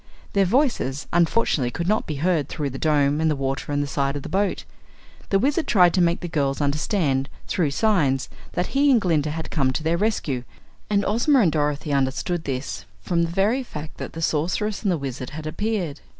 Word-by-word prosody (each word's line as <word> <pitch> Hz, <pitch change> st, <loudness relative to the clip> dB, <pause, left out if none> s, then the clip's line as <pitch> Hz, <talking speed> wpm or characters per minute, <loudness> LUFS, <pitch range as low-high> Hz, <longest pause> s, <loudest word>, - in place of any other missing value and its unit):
Their 195 Hz, -1 st, +4 dB
voices, 210 Hz, -, +1 dB
unfortunately, 170 Hz, -, +2 dB
could 170 Hz, +7 st, -4 dB
not 215 Hz, +2 st, +1 dB
be 155 Hz, -, -3 dB
heard 155 Hz, -1 st, 0 dB
through 145 Hz, -3 st, -3 dB
the 135 Hz, -, -6 dB
Dome 145 Hz, -1 st, +2 dB
and 160 Hz, -, +3 dB
the 150 Hz, -, +1 dB
water 135 Hz, +1 st, -3 dB
and 145 Hz, 0 st, +1 dB
the -, -, -4 dB
side 140 Hz, 0 st, -1 dB
of 145 Hz, -, -4 dB
the -, -, -6 dB
boat. 200 Hz, +1 st, 0 dB, 0.7 s
The 195 Hz, -, +4 dB
Wizard 290 Hz, +9 st, +1 dB
tried 180 Hz, -5 st, +5 dB
to 185 Hz, -, +3 dB
make 170 Hz, 0 st, +2 dB
the 175 Hz, -, -4 dB
girls 140 Hz, -5 st, 0 dB
understand, 145 Hz, -1 st, 0 dB, 0.2 s
through 170 Hz, -6 st, +1 dB
signs, 140 Hz, -, +1 dB, 0.3 s
that 180 Hz, -, -2 dB
he 285 Hz, +1 st, +4 dB
and 255 Hz, -4 st, +6 dB
Glinda 160 Hz, -6 st, +1 dB
had 160 Hz, +2 st, -5 dB
come 135 Hz, -4 st, +1 dB
to 155 Hz, -, -3 dB
their 165 Hz, +2 st, +1 dB
rescue, 170 Hz, -, -1 dB, 0.5 s
and 205 Hz, -1 st, +2 dB
Ozma 240 Hz, +6 st, +3 dB
and 175 Hz, -7 st, +3 dB
Dorothy 150 Hz, -1 st, -1 dB
understood 140 Hz, +5 st, 0 dB
this 130 Hz, -9 st, -4 dB
from 170 Hz, -, 0 dB
the 170 Hz, -, 0 dB
very 205 Hz, +9 st, +1 dB
fact 155 Hz, -, -8 dB
that -, -, -6 dB
the 165 Hz, -, -5 dB
Sorceress 180 Hz, +7 st, 0 dB
and 200 Hz, -, +1 dB
the 175 Hz, -, +1 dB
Wizard 135 Hz, -3 st, -5 dB
had 155 Hz, +1 st, -7 dB
appeared. 175 Hz, -2 st, -2 dB
160 Hz, 205 wpm, -23 LUFS, 140-195 Hz, 0.7 s, and